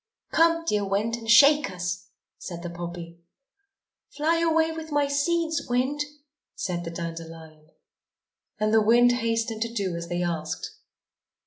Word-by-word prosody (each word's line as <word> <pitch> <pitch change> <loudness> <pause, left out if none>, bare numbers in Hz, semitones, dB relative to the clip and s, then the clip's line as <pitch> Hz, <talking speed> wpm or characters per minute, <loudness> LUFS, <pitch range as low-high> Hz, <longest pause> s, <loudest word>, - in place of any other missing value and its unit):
"Come, 330 0 +3
dear 210 -9 +1
Wind, 205 +4 0
and 225 -1 -8
shake 285 +3 +7
us!" 180 +1 -4 0.3
said 170 -2 -7
the 175 - -5
poppy. 170 0 -7 0.9
"Fly 325 +3 0
away 325 -1 +2
with 320 -1 -7
my 290 -1 +2
seeds, 320 +3 0
Wind," 255 +4 0 0.6
said 175 -2 -3
the 165 - -5
dandelion. 165 -2 -8 0.9
And 215 +1 +1
the 220 - +6
wind 240 +3 +5
hastened 230 -2 -1
to 230 0 -1
do 195 -6 -2
as 170 0 -5
they 175 +1 -2
asked. 160 -2 -3
215 Hz, 140 wpm, -26 LUFS, 175-285 Hz, 0.9 s, shake